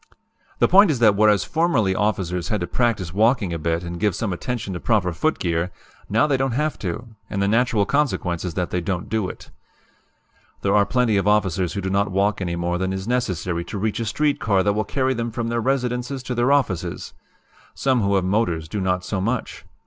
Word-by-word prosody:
"The -, -, +4 dB
point 200 Hz, +1 st, +6 dB
is 150 Hz, -, +1 dB
that 110 Hz, -4 st, +5 dB
whereas 105 Hz, -1 st, +4 dB
formerly 155 Hz, -, +1 dB
officers 95 Hz, -4 st, -1 dB
had 105 Hz, -4 st, -1 dB
to -, -, 0 dB
practice 95 Hz, -3 st, -1 dB
walking 105 Hz, -3 st, +2 dB
a 85 Hz, -, -3 dB
bit 85 Hz, +2 st, -1 dB
and 85 Hz, 0 st, -6 dB
give 105 Hz, -2 st, +1 dB
some 105 Hz, -5 st, -2 dB
attention 110 Hz, +1 st, -4 dB
to 90 Hz, -, -4 dB
proper 95 Hz, -6 st, +1 dB
footgear, 85 Hz, -, 0 dB, 0.4 s
now 115 Hz, +7 st, +3 dB
they 145 Hz, -3 st, +1 dB
don't 135 Hz, -2 st, 0 dB
have 150 Hz, +4 st, -1 dB
to, 95 Hz, +5 st, -4 dB, 0.2 s
and 100 Hz, -, -3 dB
the 100 Hz, -, +2 dB
natural 115 Hz, -1 st, +2 dB
consequence 110 Hz, -, 0 dB
is 90 Hz, -4 st, -4 dB
that 90 Hz, -1 st, -2 dB
they 90 Hz, -, -1 dB
don't 90 Hz, +1 st, -3 dB
do 110 Hz, -4 st, -1 dB
it. -, -, -11 dB, 1.1 s
"There 100 Hz, 0 st, +2 dB
are 100 Hz, -1 st, +4 dB
plenty 125 Hz, -5 st, +2 dB
of 100 Hz, -, 0 dB
officers 95 Hz, -4 st, +1 dB
who 100 Hz, -, -3 dB
do 95 Hz, 0 st, -3 dB
not 100 Hz, +1 st, +1 dB
walk 100 Hz, +2 st, 0 dB
any 85 Hz, -2 st, -2 dB
more 85 Hz, +1 st, -1 dB
than 95 Hz, 0 st, -1 dB
is 95 Hz, +1 st, -4 dB
necessary 90 Hz, -8 st, -1 dB
to -, -, -6 dB
reach 110 Hz, +2 st, -1 dB
a 115 Hz, -, -2 dB
street 145 Hz, +6 st, 0 dB
car 100 Hz, -3 st, +2 dB
that 100 Hz, +1 st, +2 dB
will 105 Hz, 0 st, -1 dB
carry 130 Hz, +4 st, 0 dB
them 120 Hz, -1 st, -2 dB
from 115 Hz, 0 st, -3 dB
their 115 Hz, 0 st, -1 dB
residences 125 Hz, +1 st, -1 dB
to 130 Hz, -, -3 dB
their 120 Hz, +2 st, +2 dB
offices. 130 Hz, -, -1 dB, 0.6 s
Some 130 Hz, -3 st, +1 dB
who 100 Hz, -1 st, +1 dB
have 95 Hz, -1 st, +1 dB
motors 90 Hz, -5 st, 0 dB
do 100 Hz, +5 st, -3 dB
not 90 Hz, -1 st, 0 dB
do -, -, -12 dB
so 100 Hz, -3 st, -2 dB
much. 115 Hz, +5 st, -3 dB
105 Hz, 220 wpm, -22 LUFS, 90-120 Hz, 1.1 s, point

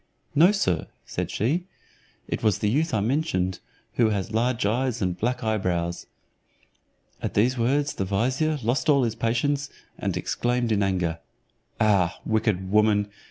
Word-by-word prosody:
"No, 165 Hz, +6 st, +6 dB
sir," 90 Hz, -, 0 dB, 0.2 s
said -, -, -3 dB
she, 160 Hz, -, -1 dB, 0.6 s
"it -, -, -3 dB
was 105 Hz, -4 st, +2 dB
the 105 Hz, -, 0 dB
youth 155 Hz, +6 st, +1 dB
I 110 Hz, -, +1 dB
mentioned, 100 Hz, -, 0 dB, 0.4 s
who 115 Hz, -3 st, +4 dB
has 105 Hz, +1 st, -2 dB
large 120 Hz, 0 st, +1 dB
eyes 120 Hz, +3 st, 0 dB
and 90 Hz, -3 st, 0 dB
black 125 Hz, +5 st, -2 dB
eyebrows." 90 Hz, -6 st, -1 dB, 1.1 s
At -, -, -3 dB
these 120 Hz, +5 st, +3 dB
words 140 Hz, +5 st, +1 dB
the -, -, -2 dB
vizier. 130 Hz, +11 st, 0 dB
lost 125 Hz, +8 st, 0 dB
all 140 Hz, -4 st, +4 dB
patience, 120 Hz, +6 st, 0 dB, 0.3 s
and -, -, -1 dB
exclaimed 120 Hz, -1 st, 0 dB
in 105 Hz, -2 st, +2 dB
anger, 90 Hz, -4 st, 0 dB, 0.6 s
"Ah, 100 Hz, -6 st, +2 dB
wicked 105 Hz, -4 st, 0 dB
woman! 105 Hz, -1 st, +3 dB
110 Hz, 145 wpm, -25 LUFS, 100-130 Hz, 1.1 s, No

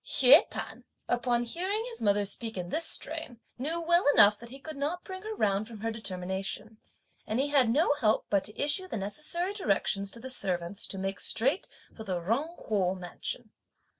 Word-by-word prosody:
Hsüeh 275 Hz, +8 st, +7 dB
P'an, -, -, -7 dB, 0.2 s
upon 240 Hz, 0 st, +1 dB
hearing 375 Hz, -, -2 dB
his 465 Hz, -, -7 dB
mother 205 Hz, -1 st, +2 dB
speak 225 Hz, +2 st, -3 dB
in 175 Hz, -1 st, -4 dB
this 325 Hz, -, 0 dB
strain, 310 Hz, -7 st, -3 dB, 0.2 s
knew 315 Hz, +6 st, -1 dB
well 345 Hz, +1 st, +3 dB
enough 205 Hz, 0 st, +7 dB
that 235 Hz, -, -11 dB
he 265 Hz, -, -9 dB
could 310 Hz, +3 st, -9 dB
not 300 Hz, +6 st, -3 dB
bring 375 Hz, 0 st, -8 dB
her 435 Hz, +2 st, -5 dB
round 205 Hz, -, +1 dB
from 225 Hz, -3 st, -10 dB
her 225 Hz, 0 st, -1 dB
determination; 195 Hz, +1 st, -4 dB, 0.5 s
and 220 Hz, +3 st, -1 dB
he 280 Hz, +2 st, +1 dB
had 270 Hz, -5 st, +4 dB
no 290 Hz, +5 st, +3 dB
help 225 Hz, -7 st, +1 dB
but 200 Hz, -2 st, +1 dB
to 210 Hz, -, -6 dB
issue 295 Hz, +6 st, +1 dB
the 295 Hz, -, -4 dB
necessary 300 Hz, -, -1 dB
directions 200 Hz, -, 0 dB
to 230 Hz, -, -7 dB
the 260 Hz, +2 st, -5 dB
servants 185 Hz, -4 st, -1 dB
to 195 Hz, -, -5 dB
make 195 Hz, +1 st, -3 dB
straight 270 Hz, -, 0 dB, 0.3 s
for 220 Hz, -, -8 dB
the 185 Hz, -4 st, -2 dB
Jung 265 Hz, -, -2 dB
Kuo 190 Hz, -3 st, 0 dB
mansion. 185 Hz, +5 st, -5 dB
230 Hz, 195 wpm, -29 LUFS, 200-305 Hz, 0.5 s, Hsüeh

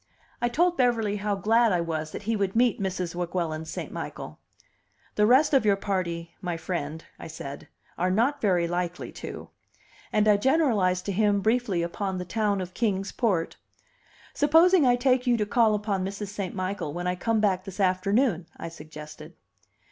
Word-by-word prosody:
I 240 Hz, -, +2 dB
told 345 Hz, +7 st, +2 dB
Beverly 225 Hz, -5 st, +1 dB
how 205 Hz, 0 st, -1 dB
glad 225 Hz, +4 st, +3 dB
I 180 Hz, -, +2 dB
was 160 Hz, -2 st, -3 dB
that -, -, -7 dB
he 225 Hz, +2 st, 0 dB
would 195 Hz, -1 st, -1 dB
meet 240 Hz, -3 st, +2 dB
Mrs. 185 Hz, -3 st, -2 dB
Weguelin 170 Hz, -2 st, -3 dB
St. 160 Hz, -, -6 dB
Michael. -, -, -7 dB, 0.7 s
"The 210 Hz, 0 st, +3 dB
rest 270 Hz, +6 st, +5 dB
of 270 Hz, -, +5 dB
your 205 Hz, -2 st, +4 dB
party, 175 Hz, -4 st, -3 dB
my 175 Hz, -2 st, -3 dB
friend," 160 Hz, -2 st, -4 dB
I -, -, -8 dB
said, 140 Hz, -3 st, -8 dB, 0.3 s
"are 180 Hz, +1 st, +2 dB
not 245 Hz, +10 st, +1 dB
very 180 Hz, -5 st, +2 dB
likely 175 Hz, 0 st, -3 dB
to." -, -, -8 dB, 0.6 s
And 215 Hz, 0 st, +2 dB
I 210 Hz, -1 st, +6 dB
generalized 205 Hz, -, +2 dB
to 200 Hz, -, -1 dB
him 205 Hz, +1 st, +2 dB
briefly 215 Hz, -4 st, +1 dB
upon 190 Hz, +2 st, -3 dB
the 180 Hz, -, -4 dB
town 205 Hz, +1 st, 0 dB
of 180 Hz, 0 st, -7 dB
Kings 200 Hz, -4 st, -1 dB
Port. 195 Hz, -9 st, -1 dB, 0.8 s
"Supposing 325 Hz, +1 st, +5 dB
I 245 Hz, -, +5 dB
take 250 Hz, 0 st, +1 dB
you 240 Hz, -1 st, +4 dB
to 210 Hz, -, 0 dB
call 220 Hz, 0 st, +3 dB
upon 205 Hz, -2 st, -1 dB
Mrs. 200 Hz, +1 st, -5 dB
St. 200 Hz, -3 st, -5 dB
Michael 185 Hz, -5 st, -3 dB
when 175 Hz, +2 st, -4 dB
I 180 Hz, -, +1 dB
come 220 Hz, +5 st, 0 dB
back 190 Hz, -3 st, +1 dB
this 195 Hz, 0 st, -9 dB
afternoon?" 190 Hz, 0 st, +1 dB
I -, -, -6 dB
suggested. 155 Hz, 0 st, -11 dB
200 Hz, 180 wpm, -26 LUFS, 180-225 Hz, 0.8 s, I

